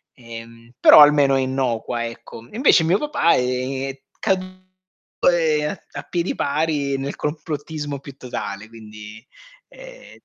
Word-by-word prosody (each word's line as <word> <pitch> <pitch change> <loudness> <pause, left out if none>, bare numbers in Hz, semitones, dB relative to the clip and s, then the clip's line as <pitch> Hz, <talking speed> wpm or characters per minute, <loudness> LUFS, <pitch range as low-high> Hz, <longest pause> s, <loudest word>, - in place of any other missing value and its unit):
ehm, 115 -1 -12
però - - +8
almeno 145 -2 +6
è 135 - +2
innocua, 125 -3 -2
ecco. 115 0 -10
Invece 220 - +4
mio 170 +4 +3
papà 250 - +2
è 130 +2 -2 0.2
caduto, 185 0 -2 0.7
ehm, 155 -3 0
a - - -6
piedi 175 +1 -2
pari 145 -2 -1
nel 135 +1 -4
complottismo 150 -1 -5
più 140 -1 -12
totale, 110 -4 -6
quindi 110 0 -12 0.4
ehm - - -14
140 Hz, 125 wpm, -21 LUFS, 120-160 Hz, 0.7 s, però